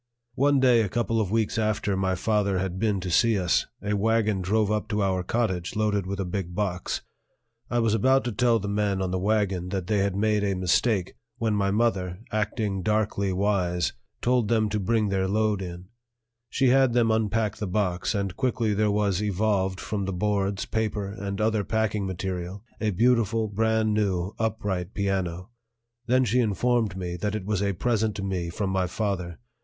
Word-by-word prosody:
One 140 +1 +3
day 125 -3 +5
a 105 - -1
couple 115 +1 0
of 100 - -1
weeks 110 +1 0
after 105 -2 0
my 95 -1 0
father 100 0 +1
had 95 0 -2
been 105 -3 +1
to 90 -1 -4
see 115 +4 +4
us, 90 -2 +1 0.2
a 105 +1 -1
wagon 110 -1 +1
drove 105 +3 +1
up 105 0 -1
to 105 -2 0
our 95 -1 +1
cottage 95 -3 -1
loaded 105 -3 0
with 100 +1 -4
a 95 - -1
big 90 -1 -4
box. 90 -3 -2 0.7
I 120 - 0
was 115 -2 +2
about 130 +5 +3
to 120 - -2
tell 115 +2 +3
the 100 -2 -4
men 100 -1 0
on 95 -1 -1
the 95 - -1
wagon 95 -3 0
that 95 -2 -2
they 105 +2 +1
had 100 -1 0
made 105 0 +1
a 100 -1 0
mistake, 95 +2 +1 0.2
when 115 -2 0
my 100 -1 +1
mother, 100 -4 0
acting 105 -2 -1
darkly 105 -1 0
wise, 90 -3 0 0.3
told 125 -2 +2
them 110 -1 +2
to 105 +1 -1
bring 110 +1 +1
their 95 -1 0
load 105 0 +1
in; 90 0 -7 0.6
she 130 -2 +2
had 130 -1 +4
them 115 -2 +3
unpack 110 -1 0
the 105 - -3
box, 90 0 -1
and 100 -2 -2
quickly 125 -5 0
there 105 +1 +2
was 100 -2 +1
evolved 100 -2 0
from 100 -2 -3
the 95 - -2
boards, 100 +1 0
paper, 105 -3 -2
and 100 -1 -5
other 110 -1 +1
packing 110 -2 -1
material 95 +1 -4 0.2
a 110 - 0
beautiful, 115 +1 +2
brand 110 +1 +1
new, 95 -2 0
upright 100 -4 -2
piano. 95 -1 -2 0.6
Then 130 +1 +3
she 120 +3 +2
informed 110 -2 +1
me 90 -1 -4
that 105 +4 -2
it 100 -3 -4
was 105 -2 -1
a 100 -1 +1
present 110 +1 0
to 100 - -4
me 90 -3 -2
from 95 +2 -2
my 95 -1 +1
father. 90 -3 -3
105 Hz, 190 wpm, -26 LUFS, 95-110 Hz, 0.7 s, day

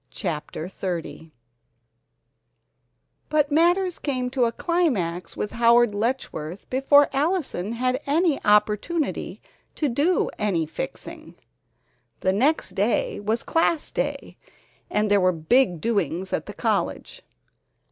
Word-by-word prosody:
CHAPTER 155 +1 -4
XXX 175 -3 -5 2.0
But 300 -1 +2
matters 350 +4 +2
came 255 -3 -2
to 255 -2 +2
a 230 - 0
climax 230 - -1
with 210 - -3
Howard 235 -1 +4
Letchworth 205 -7 -3
before 280 +2 +5
Allison 280 - -1
had 255 +3 -1
any 315 0 +1
opportunity 210 +10 +1 0.3
to 300 - 0
do 290 +9 +1
any 190 -6 0
"fixing." 155 - -7 0.9
The 185 - +2
next 260 0 +1
afternoon 205 -1 0
was 225 +2 +1
Class 330 -1 +1
Day - - -3 0.5
and 210 0 0
there 200 -1 +4
were 185 0 +4
big 175 +3 +2
doings 190 -3 -1
at - - -2
the - - -7
college. - - -2
235 Hz, 115 wpm, -24 LUFS, 190-290 Hz, 2.0 s, before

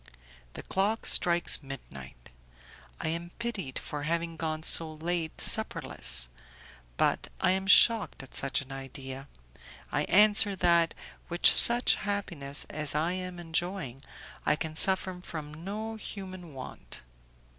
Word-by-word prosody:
The - - -9
clock 205 +4 -1
strikes 175 -2 +2
midnight; 70 - -11 0.7
I - - -2
am 170 +1 -4
pitied 215 - -4
for 150 - -6
having 165 +2 -2
gone 160 -1 -4
so 160 -1 +4
late 165 0 -3
supperless, - - +3 0.7
but - - 0
I - - +2
am 190 +1 -1
shocked 220 -5 +4
at 135 - -15
such 135 0 0
an 135 -1 -12
idea; 135 0 -8 0.6
I - - 0
answer 205 +1 +5
that, 170 -2 +2 0.3
with 175 +1 -4
such 240 +1 +7
happiness 175 -9 -4
as 155 -1 +1
I 160 +3 0
am 180 -1 -5
enjoying, 165 -5 -4 0.4
I - - +2
can 155 0 -5
suffer 185 +1 -1
from 155 -4 -7
no 215 +3 -5
human 185 -7 -9
want. 130 - -9
170 Hz, 130 wpm, -28 LUFS, 145-190 Hz, 0.7 s, such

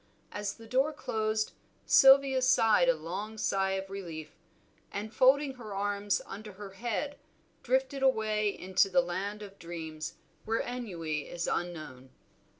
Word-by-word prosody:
As 205 -1 -3
the 225 - -13
door 265 +6 +2
closed, 215 -5 -1 0.3
Sylvia 270 -1 +7
sighed 225 -8 +4
a 170 - +4
long 185 +8 -5
sigh 195 -2 +1
of 195 0 -3
relief, 170 -6 -7 0.6
and 210 +2 -5
folding 270 +2 +4
her 215 -5 -7
arms 205 0 0
under 210 0 -8
her 195 0 -9
head 240 +8 -3 0.4
drifted 265 +2 0
away 215 -5 +2
into 190 0 +1
the 180 -1 +4
land 195 +4 -4
of 200 -1 -12
dreams, 160 -2 -6 0.3
where 225 +1 0
ennui 170 -12 -4
is 170 -1 -3
unknown. 155 -7 -4
205 Hz, 140 wpm, -30 LUFS, 180-230 Hz, 0.6 s, Sylvia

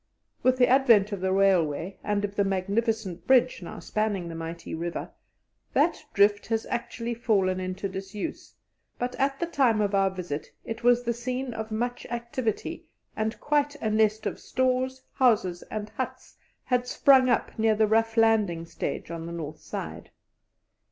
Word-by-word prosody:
With 255 0 +3
the 250 -1 +5
advent 235 -6 +5
of 200 -3 -4
the 190 0 +1
railway 185 -3 +2
and 205 0 0
of 200 0 -7
the 200 - +3
magnificent 195 -1 -1
bridge 255 -3 +4
now 175 - -8
spanning 210 -5 -2
the - - -6
mighty 165 +1 -6
river, 170 +1 -4 0.6
that - - +2
drift 205 0 +3
has 225 -1 -1
actually 235 -1 -3
fallen 195 -5 +1
into 185 +2 -3
disuse, 195 - -6 0.4
but 245 +1 -2
at 275 0 0
the 340 - 0
time 260 -9 +2
of 205 -1 +1
our 195 -1 +3
visit 175 -6 -5 0.2
it 225 +1 -6
was 245 0 +4
the 235 0 0
scene 250 +1 -3
of 220 0 -5
much 240 +3 -3
activity, 235 -1 -3 0.3
and 220 +1 -2
quite 290 0 +1
a 220 -6 -2
nest 215 0 +2
of - - -3
stores, 260 0 0
houses, 210 -9 +2
and 215 -1 -5
huts, - - -6 0.3
had 250 -1 0
sprung 260 -1 +5
up 240 - +1
near 220 0 +4
the 215 +1 +4
rough 225 +1 +2
landing 210 -7 +3
stage 165 - -4
on 165 0 -5
the - - -6
north 160 -3 -6
side. - - -7
220 Hz, 165 wpm, -27 LUFS, 190-245 Hz, 0.6 s, the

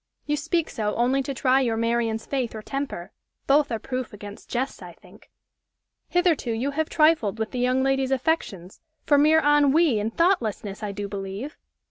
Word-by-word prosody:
You 295 - 0
speak 330 +2 -1
so 210 -2 -2
only 255 +3 +2
to 270 - -4
try 265 0 +2
your 230 -3 0
Marian's 230 -1 0
faith 255 -5 -2
or 215 - -7
temper 275 -11 -5 0.3
both 285 0 +3
are 225 - 0
proof 255 +1 -5
against 205 0 -10
jests, 260 +3 -3
I - - -10
think. - - -19 0.8
Hitherto 350 -8 +1
you 250 +6 -1
have 315 +2 -2
trifled 305 - +3
with 220 -1 -3
the 250 - -4
young 255 +1 +2
lady's 270 -1 +1
affections 255 - -2 0.2
for 290 -1 +4
mere 310 +2 +5
ennui 295 -2 +4
and 215 +2 -2
thoughtlessness, 225 - 0
I 210 -1 -3
do 200 0 -5
believe! 200 +7 -6
255 Hz, 175 wpm, -24 LUFS, 220-290 Hz, 0.8 s, mere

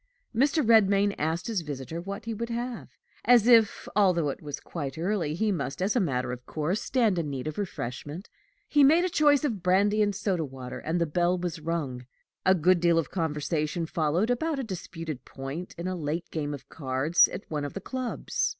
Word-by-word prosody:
Mr. 280 +2 +2
Redmain 200 -3 +5
asked 160 +3 -1
his 220 -6 -1
visitor 150 +2 -5
what 200 +4 -6
he 230 - -3
would 230 +2 -4
have, 235 0 -4 0.4
as 240 -1 +6
if, 230 -4 +5
although 180 -7 +3
it - - -5
was 145 -1 -5
quite 140 -5 -6
early, 170 -3 -1
he 215 +4 +1
must, 145 -6 -3
as 195 +5 0
a - - +4
matter 130 - 0
of 125 0 -6
course, 160 +7 -1
stand 225 -9 +2
in 155 -3 -2
need 135 -1 -4
of 155 +5 -4
refreshment. 150 - -5 0.4
He 290 -1 +4
made 325 +6 +5
choice 295 -2 +4
of 230 -10 -1
brandy 200 +4 +3
and 205 -1 +1
soda 190 -4 0
water, 130 -3 -7
and 165 +3 -1
the 170 - +2
bell 175 +3 +1
was 175 -1 -3
rung. 150 -6 -3 0.4
A 190 - +6
good 180 +1 +4
deal 170 -1 +3
of 165 -4 0
conversation 160 -1 -1
followed 165 +8 0
about 310 +5 0
a 270 - -2
disputed 165 - -6
point 140 +7 -7
in 170 +2 -4
a 185 - -2
late 160 0 -3
game 150 -2 -2
of 140 - -13
cards 140 +3 +3
at - - -7
one 150 -2 -1
of 145 - -4
the - - -2
clubs. 255 +4 -2
175 Hz, 200 wpm, -27 LUFS, 150-210 Hz, 0.4 s, as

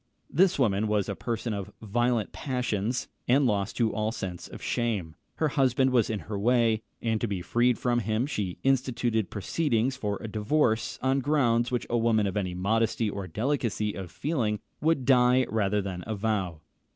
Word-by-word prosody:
This 185 +4 +4
woman 110 -5 +2
was 105 -2 +1
a 100 - -3
person 115 0 -3
of 100 -2 -5
violent 120 +1 0
passions, 125 -3 -2 0.2
and 135 +3 +4
lost 105 -3 0
to 115 -3 +2
all 110 +1 0
sense 90 -6 -5
of - - -10
shame. 105 -10 -2 0.2
Her 155 - +1
husband 130 -1 +2
was 120 -4 +3
in 110 -2 -2
her 105 -2 -5
way, 115 0 +3 0.2
and 115 -2 0
to 120 - 0
be 95 -4 -3
freed 120 +6 +2
from 120 -1 +1
him 110 +2 0
she 105 -11 -3
instituted 120 -5 +1
proceedings 125 - 0
for 105 -5 -2
a 115 - -6
divorce, 110 +2 +1
on 135 +1 +2
grounds 125 -4 +2
which 125 -2 -1
a 120 - +1
woman 110 -2 +3
of 95 0 -2
any 95 -4 -1
modesty 110 +3 +1
or 100 -2 -5
delicacy 110 - -1
of 95 -2 -6
feeling 115 - -1 0.2
would 155 -4 +2
die 125 0 +5
rather 105 -2 +1
than 90 -2 -5
avow. 100 -6 -2
115 Hz, 175 wpm, -28 LUFS, 105-125 Hz, 0.2 s, die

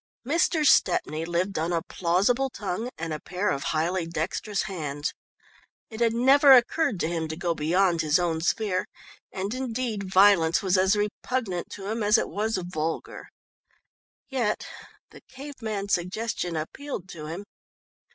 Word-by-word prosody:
Mr. 320 +1 +2
Stepney 165 - +3
lived 175 +2 -1
on 165 +2 -1
a 165 -2 0
plausible 200 +10 +1
tongue 215 +1 -4
and 165 -1 -4
a 155 - -4
pair 185 +5 -2
of 140 - -3
highly 165 +2 0
dexterous 175 +5 -2
hands. 150 -7 -4 0.8
It 220 - -8
had 235 -1 +3
never 270 +4 +6
occurred 250 - +3
to - - +1
him 165 -1 -2
to 155 - -5
go 170 0 -1
beyond 170 +2 +2
his 155 +2 +3
own 170 -3 -1
sphere, 185 +1 0 0.4
and 195 +3 -3
indeed 235 -6 -3
violence 190 -4 +5
was 190 -1 +2
as 190 +2 +4
repugnant 210 -2 -2
to 195 - -8
him 225 +2 -2
as 210 +2 +4
it - - -1
was 215 +1 -1
vulgar. 165 -3 -4 1.0
Yet 240 -6 -1 0.5
the - - -14
cave 275 0 -10
man 210 -3 -3
suggestion 180 -1 -2
appealed 190 - -5
to 155 -4 -8
him. 170 +6 -6
190 Hz, 150 wpm, -26 LUFS, 170-225 Hz, 1.0 s, never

